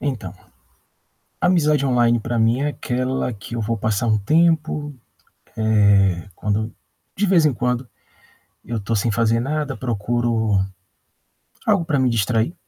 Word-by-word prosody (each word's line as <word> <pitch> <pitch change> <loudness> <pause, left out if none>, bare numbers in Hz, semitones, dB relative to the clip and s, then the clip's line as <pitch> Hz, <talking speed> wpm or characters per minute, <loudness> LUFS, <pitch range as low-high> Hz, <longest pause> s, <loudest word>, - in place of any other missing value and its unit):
Então, 115 - -4 1.1
amizade 155 -6 +3
online 120 -2 +3
pra 120 +1 -2
mim 115 +4 +2
é 145 - +1
aquela 130 -2 -2
que 110 +3 -8
eu 115 - -2
vou 115 +1 -1
passar 110 +2 -1
um 110 -1 +3
tempo, 155 +4 +1 1.2
eh, 85 +2 -9
quando 105 +4 -2 0.4
de 205 - +1
vez 180 -4 +4
em 150 - +3
quando, 125 +1 -2 0.8
eu 115 - -4
estou 110 +2 -2
sem 110 +2 0
fazer 115 +1 +2
nada, 145 +2 -2
procuro 115 -2 0 1.1
algo 205 -5 +3
para 155 -4 0
me 130 -2 +2
distrair, 115 - 0
120 Hz, 135 wpm, -21 LUFS, 110-145 Hz, 1.2 s, vez